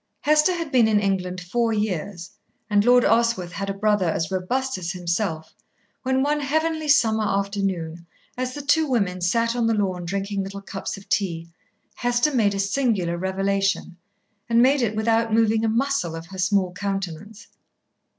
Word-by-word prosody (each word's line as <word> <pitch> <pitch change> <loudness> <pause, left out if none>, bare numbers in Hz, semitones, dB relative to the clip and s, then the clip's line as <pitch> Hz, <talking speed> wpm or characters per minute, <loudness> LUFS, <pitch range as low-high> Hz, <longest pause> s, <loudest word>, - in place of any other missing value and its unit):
Hester 305 +4 +3
had 335 -4 -4
been 245 -4 +4
in 215 -1 +3
England 185 -2 -1
four 225 +6 -1
years, 200 -4 -3 0.4
and 205 0 +4
Lord 245 +1 +5
Oswyth 225 -6 +2
had 195 +2 -4
a - - -1
brother 205 -3 +1
as 165 +2 -2
robust 245 +6 -1
as 175 -1 -3
himself, 170 -2 -3 0.5
when 260 0 +1
one 295 +1 +1
heavenly 315 +2 -1
summer 225 -7 +3
afternoon, 195 -5 -2 0.3
as 255 0 -3
the 290 - -6
two 310 +2 +3
women 200 -8 0
sat 230 +6 +1
on 235 -2 +1
the 225 - +2
lawn 185 -4 -1
drinking 195 +2 -2
little 195 +1 -7
cups 195 0 -5
of 195 - -14
tea, 170 -4 -1 0.4
Hester 245 +4 +1
made 210 -5 +2
a - - -3
singular 200 -4 0
revelation, 195 +1 -1 0.5
and 230 0 +4
made 265 +3 +4
it 220 -3 0
without 225 +1 +1
moving 225 0 +3
a 225 - +2
muscle 235 -7 0
of 165 0 -7
her 190 +2 -10
small 185 0 +1
countenance. 195 +1 -5
205 Hz, 170 wpm, -23 LUFS, 185-240 Hz, 0.5 s, Lord